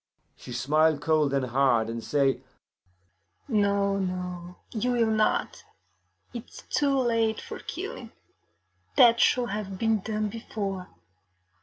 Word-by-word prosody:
She - - -11
smile 150 +6 +2
cold 150 -1 +1
and 135 -2 +1
hard, 120 -3 +2
and 115 0 -5
say, 140 -2 +1 1.1
'No, 200 -4 +2
no, 180 -1 -4 0.2
you 245 +2 -1
will 230 -2 +2
not; 215 0 0 0.7
it 235 -2 -7
is - - -12
too 280 -2 +2
late 230 -3 +1
for - - -8
killing; - - -7 0.8
that 235 -2 +6
should 245 -2 +3
have 200 -2 -4
been 225 +1 +1
done 215 +1 -2
before. 200 -4 -5
195 Hz, 125 wpm, -27 LUFS, 150-225 Hz, 1.1 s, that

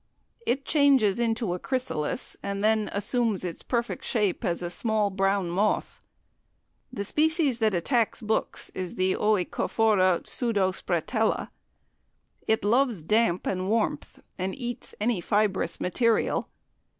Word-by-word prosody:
It 270 +3 0
changes 270 -9 +4
into 225 -4 0
a 180 - -4
chrysalis, 255 - -2
and 200 0 -3
then 215 0 +2
assumes 215 0 0
its 175 -2 -5
perfect 235 -1 -2
shape 210 -5 0
as 175 +1 -1
a 175 - -2
small 215 0 0
brown 195 -2 0
moth. 200 +4 0 0.9
The 225 -5 -4
species 305 - +1
that 215 -4 +2
attacks 230 +6 +1
books 220 -2 -2
is 185 -2 -5
the 185 0 +1
OEcophora 205 -1 +2
pseudospretella. 200 -1 0 1.0
It 220 -2 +1
loves 235 - +2
damp 210 0 +2
and 185 0 -1
warmth, 225 0 -1 0.2
and 185 +1 -2
eats 245 -3 -5
any 215 -3 0
fibrous 205 -3 0
material. 230 +5 +1
215 Hz, 125 wpm, -27 LUFS, 185-235 Hz, 1.0 s, changes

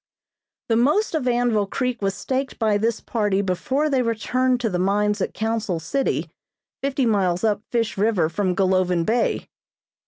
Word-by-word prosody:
The 225 - +3
most 295 - +2
of 305 -6 -1
Anvil 240 -4 +2
Creek 250 +1 -2
was 195 -1 0
staked 265 +1 -3
by 215 -3 +2
this 230 +1 0
party 205 -4 0
before 260 +11 0
they 270 -4 +2
returned 250 +2 0
to 230 - 0
the 180 - -1
mines 205 +2 +1
at - - -2
Council 220 -5 -1
City, 265 - -1 0.5
fifty 275 -1 0
miles 190 -5 +1
up 210 -2 +1
Fish 230 -4 -1
River 200 -6 +2
from 180 +2 -1
Golovin 185 -3 +2
Bay. 230 +4 0
220 Hz, 160 wpm, -23 LUFS, 195-250 Hz, 0.5 s, The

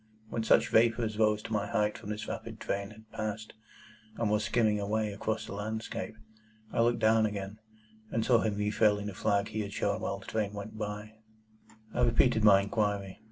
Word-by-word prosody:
When 115 - -1
such - - +4
vapour 115 +1 +4
as 110 0 -4
rose 105 -1 +3
to 115 - -5
my 105 -1 0
height 105 0 +1
from 105 - -9
this 105 0 -4
rapid 115 -1 -6
train 100 0 -2
had 110 0 -16
passed 110 0 -4
me, 110 - -34 0.5
and 115 -3 0
was 105 0 +2
skimming 110 -3 +2
away 105 +1 -1
over 110 +2 -1
the - - -7
landscape, 110 +2 -4 0.6
I - - +2
looked 120 +1 +3
down 110 0 +4
again, 100 0 -5 0.5
and 115 0 -1
saw 120 -3 +5
him 110 -2 0
refurling 105 0 +2
the 105 - -4
flag 100 +2 +1
he 110 - -4
had 100 -1 -3
shown 100 -2 -1
while 100 - -2
the 95 - -13
train 105 -2 -2
went 105 +1 -7
by. 105 0 -5 0.8
I 125 - 0
repeated 120 -1 +3
my 100 -2 +7
inquiry. 100 -1 -1
105 Hz, 200 wpm, -30 LUFS, 105-110 Hz, 0.8 s, my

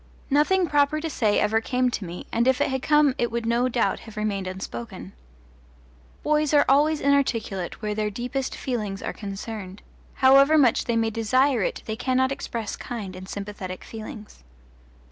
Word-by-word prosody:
Nothing 350 +6 +3
proper 290 0 +2
to 320 0 -4
say 215 -7 +2
ever 220 +1 +2
came 250 +1 0
to 210 - -4
me, 175 +1 -7
and 235 +2 +1
if 260 -1 +3
it - - +1
had 265 -1 -1
come 295 -2 +4
it 240 - +1
would 235 0 -3
no 235 +2 +2
doubt 240 -1 0
have 220 -1 -13
remained 200 -3 -2
unspoken. 185 -11 -7 1.1
Boys 300 0 +2
are 285 - +5
always 295 +3 +4
inarticulate 230 -10 0
where 210 0 -1
their 210 0 -1
deepest 250 +5 -3
feelings 210 -6 -3
are - - -3
concerned; 200 -1 -7 0.3
however 275 +3 +6
much 255 -6 +4
they 235 - 0
may 225 0 +1
desire 245 +3 +2
it - - -2
they 220 - -3
cannot 260 +2 +1
express 230 -5 -4
kind 205 -6 -6
and 185 +1 -9
sympathetic 200 -2 -6
feelings. 220 - -10
235 Hz, 170 wpm, -25 LUFS, 210-275 Hz, 1.1 s, however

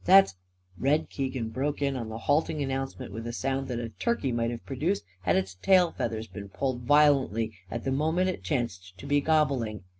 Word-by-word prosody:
That's 190 - +7 0.3
" 90 - -43
Red 145 +4 +1
Keegan 130 -4 -2
broke 140 +6 -2
in 140 -1 0
on 115 -3 -4
the 110 - -5
halting 150 +5 +1
announcement 135 -4 -4
with 115 +2 -5
a - - -2
sound 135 +2 -2
that 125 - -3
a 115 -1 -3
turkey 190 - -1
might 115 -1 0
have 120 -1 -6
produced 155 +9 -1 0.2
had 90 -1 +2
its 95 0 0
tail 180 - +5
feathers 110 -1 -3
been 100 -2 -9
pulled 130 +4 -2
violently 130 -6 +3 0.2
at 115 - -4
the 135 - -1
moment 160 +7 +1
it 185 - -2
chanced 95 - -3
to - - -10
be 145 0 +2
gobbling. 135 -10 +1
130 Hz, 205 wpm, -28 LUFS, 115-145 Hz, 0.3 s, That's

